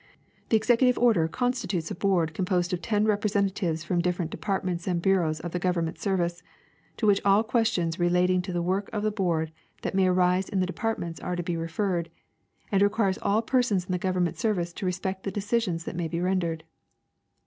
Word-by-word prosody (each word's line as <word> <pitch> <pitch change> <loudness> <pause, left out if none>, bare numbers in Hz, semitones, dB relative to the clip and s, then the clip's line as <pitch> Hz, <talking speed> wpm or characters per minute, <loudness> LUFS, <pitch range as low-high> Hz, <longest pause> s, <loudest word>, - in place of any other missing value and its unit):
The 225 - +5
executive 245 +3 +3
order 220 -10 +4
constitutes 195 -6 -2
a - - -1
board 175 -4 +1
composed 180 0 0
of 180 - -2
ten 210 0 +1
representa 205 -2 +1
tives 165 -5 -2
from 175 0 +1
different 175 -1 -1
departments 185 -4 -2
and 180 -2 +1
bureaus 170 -4 +1
of 175 - -5
the 180 - -2
Government 175 -2 -1
service, 175 -3 -1 0.6
to 225 - -1
which 205 -2 +4
all 200 +2 +4
questions 220 -8 0
relating 180 +1 +3
to 185 +1 -6
the 175 -1 -1
work 190 +3 -1
of 210 -1 -2
the 215 - +1
board 170 -6 0 0.3
that - - -2
may 190 -1 +3
arise 180 +1 +2
in 195 - -1
the 185 - +2
departments 185 -4 -3
are 180 - -3
to 175 - -3
be 175 -1 -2
referred, 170 +1 -1 0.6
and 195 -1 +3
re 205 - +5
quires 200 -3 0
all 215 +3 +2
persons 225 -7 +1
in 185 - -5
the 180 - 0
Government 180 -2 0
service 180 -7 -1
to 190 - -4
respect 190 +1 -2
the 195 - -4
decis 210 +3 0
ions 165 -2 -2
that - - -6
may 170 -1 -2
be 165 +1 -3
rendered. 175 -3 -1
185 Hz, 205 wpm, -27 LUFS, 175-205 Hz, 0.6 s, The